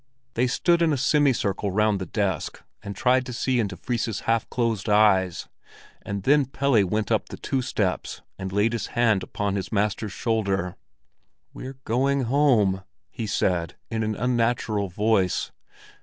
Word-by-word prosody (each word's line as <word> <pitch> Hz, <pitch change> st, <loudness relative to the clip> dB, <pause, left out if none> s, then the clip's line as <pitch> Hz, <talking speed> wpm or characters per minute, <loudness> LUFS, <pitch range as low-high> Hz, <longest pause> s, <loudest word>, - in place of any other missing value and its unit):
They 125 Hz, +2 st, +1 dB
stood 170 Hz, +6 st, +2 dB
in 165 Hz, -2 st, +3 dB
a 145 Hz, -, +1 dB
semicircle 130 Hz, -8 st, +1 dB
round 105 Hz, +1 st, +2 dB
the 95 Hz, -, -5 dB
desk, 95 Hz, -4 st, -2 dB, 0.2 s
and 100 Hz, -1 st, -7 dB
tried 130 Hz, +4 st, +3 dB
to 125 Hz, -, -5 dB
see 125 Hz, +1 st, 0 dB
into 100 Hz, -5 st, -2 dB
Fris's 115 Hz, -4 st, -2 dB
half 115 Hz, -1 st, 0 dB
closed 115 Hz, -4 st, -1 dB
eyes; 95 Hz, -4 st, +3 dB, 0.5 s
and 100 Hz, -1 st, -5 dB
then 145 Hz, +3 st, +4 dB
Pelle 135 Hz, -4 st, +2 dB
went 105 Hz, +2 st, -1 dB
up -, -, +1 dB
the -, -, -8 dB
two 135 Hz, -, -1 dB
steps 105 Hz, -7 st, -2 dB, 0.2 s
and 95 Hz, -1 st, -4 dB
laid 105 Hz, +4 st, +1 dB
his 115 Hz, -, -2 dB
hand 110 Hz, -5 st, +3 dB
upon 100 Hz, +1 st, -3 dB
his 95 Hz, -1 st, -5 dB
master's 105 Hz, 0 st, -1 dB
shoulder. 100 Hz, -5 st, -1 dB, 0.8 s
"We're 130 Hz, +1 st, -8 dB
going 135 Hz, +4 st, +1 dB
home," 120 Hz, -7 st, +2 dB, 0.3 s
he 115 Hz, -, -5 dB
said, 90 Hz, -4 st, 0 dB, 0.2 s
in 110 Hz, -1 st, -1 dB
an 110 Hz, -1 st, -1 dB
unnatural 115 Hz, -3 st, 0 dB
voice. 100 Hz, -1 st, +1 dB
110 Hz, 155 wpm, -25 LUFS, 100-125 Hz, 0.8 s, then